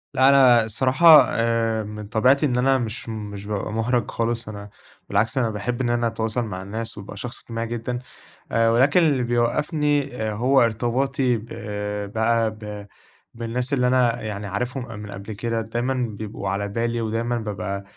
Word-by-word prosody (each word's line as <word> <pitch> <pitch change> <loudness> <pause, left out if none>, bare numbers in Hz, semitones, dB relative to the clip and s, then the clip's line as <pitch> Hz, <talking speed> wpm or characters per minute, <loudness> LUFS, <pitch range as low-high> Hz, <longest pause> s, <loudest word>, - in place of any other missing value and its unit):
لا، 130 +1 +6
أنا 130 -4 +6
الصراحة 130 +8 +6
آآ، 115 -1 0
من 105 0 -7
طبيعتي 130 +7 +3
إن 125 -3 0
أنا 135 +1 +3
مش 115 -1 -4
مش 105 -2 -6
بابقى 105 0 -3
مُحرَج 120 +2 0
خالص 115 -1 -2
أنا 100 -1 -8 0.4
بالعكس، 115 +5 +1
أنا 120 -3 +2
باحب 115 +4 -3
إن 120 - 0
أنا 120 0 +1
أتواصل 115 +1 -2
مع 95 -4 -5
الناس 110 +3 -6
وابقى 100 0 -9
شخص 120 +3 -5
اجتماعي 115 0 -4
جدًا، 120 +1 -3 0.5
آآ، 115 0 +3
ولكن 135 +9 +4
اللي 140 -6 +2
بيوقّفني 140 +3 0
آآ، 110 -1 -1
هو 130 +4 +3
ارتباطي 125 +3 +1
ب 110 - -9 0.7
بقى 115 0 +2
ب 105 -1 -8 0.5
بالناس 120 +3 -3
اللي 125 -2 +2
أنا 120 -2 +2
يعني 105 -1 -5
عارفهم 125 +6 -3
ق 115 - -11
من 105 0 -8
قبل 100 +3 -7
كده 115 +2 -2
دايمًا 120 +4 -2
بيبقوا 110 -5 -4
على 100 +1 -1
بالي 115 +3 -2
ودايمًا 115 +2 -1
بابقى 100 -2 -4
115 Hz, 170 wpm, -23 LUFS, 110-125 Hz, 0.7 s, لا